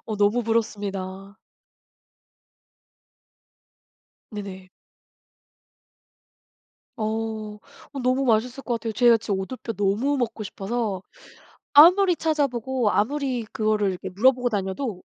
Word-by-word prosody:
어 215 -2 -3
너무 205 +4 +2
부럽습니다. 200 -3 -3 2.9
네네. 195 -3 -8 2.3
어. 220 -1 -3 0.3
어 275 - -6
너무 255 +2 +1
맛있을 245 +3 +1
것 240 - -2
같아요. 225 -1 -3
제가 240 0 +5
지금 200 -3 -3
오돌뼈 235 +3 -5
너무 210 +8 0
먹고 230 -3 -3
싶어서 200 -1 -3 0.7
아무리 355 +5 +7
찾아보고 265 -7 0
아무리 260 +1 0
그거를 215 -2 +1
이렇게 180 - -6
물어보고 245 +5 +3
다녀도 200 +1 -3
225 Hz, 230 characters per minute, -24 LUFS, 205-255 Hz, 2.9 s, 아무리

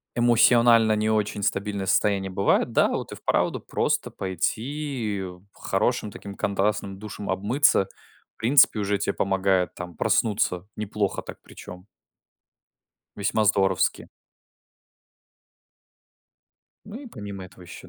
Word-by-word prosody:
эмоционально 120 -1 +5
не 110 +1 0
очень 105 -1 -1
стабильное 100 0 -1
состояние 100 0 +1
бывает, 100 +1 +1
да, - - +4
вот - - -4
и - - -6
вправду - - 0
просто - - -1
пойти, 115 - -3
э, 90 -1 -8
хорошим 105 +2 -1
таким 100 0 -9
контрастным 100 -1 -1
душем 105 0 -8
обмыться, 100 +3 +2 0.5
в - - -82
принципе, 120 -1 +5
уже 100 0 0
тебе 100 - -1
помогает 95 -1 0
там 90 -2 -8
проснуться 100 -3 0
неплохо 105 -1 -2
так, - - -10
причём. 90 +1 -12 1.3
Весьма 105 +2 0
здоровски. 95 -3 +1 2.8
Ну 215 +5 -9
и 280 - -10
помимо 100 - -8
этого, 90 0 -15
ещё 85 - -12
100 Hz, 115 wpm, -25 LUFS, 95-110 Hz, 2.8 s, эмоционально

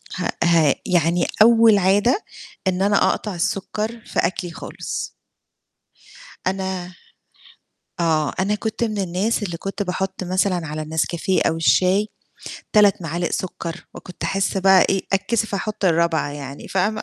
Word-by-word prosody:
هأ 180 - -2
ها 165 -5 +4
يعني 175 -1 +2
أول 225 -1 +7
عادة 200 - +2 0.4
إن 185 0 0
أنا 200 0 +3
أقطع 210 -3 -3
السُكّر 210 +5 -3
في - - -2
أكلي 175 -1 -1
خالص. - - -6 1.4
أنا 190 -1 -3 1.1
آه، 155 -3 +1
أنا 200 +2 +1
كنت 220 +2 -3
من 215 -2 -2
الناس 195 +4 -1
اللي 175 -4 -4
كنت 195 +3 -4
باحُط 190 0 -3
مثلًا 185 -2 0
على 155 +1 -4
النسكافيه 160 +4 -1
أو 160 - 0
الشاي 185 +5 +3 0.7
3 205 -4 +4
معالق 170 +2 -2
سُكّر 170 -2 -5
وكنت 180 - -10
أحِس 195 0 0
بقى 190 0 +6
إيه، 195 -1 +1
أتكسف 215 +2 0
أحُط 205 +1 -3
الرابعة 170 -3 +2
يعني 140 -1 -8
فاهمة؟ 210 +3 0
190 Hz, 135 wpm, -21 LUFS, 170-205 Hz, 1.4 s, أول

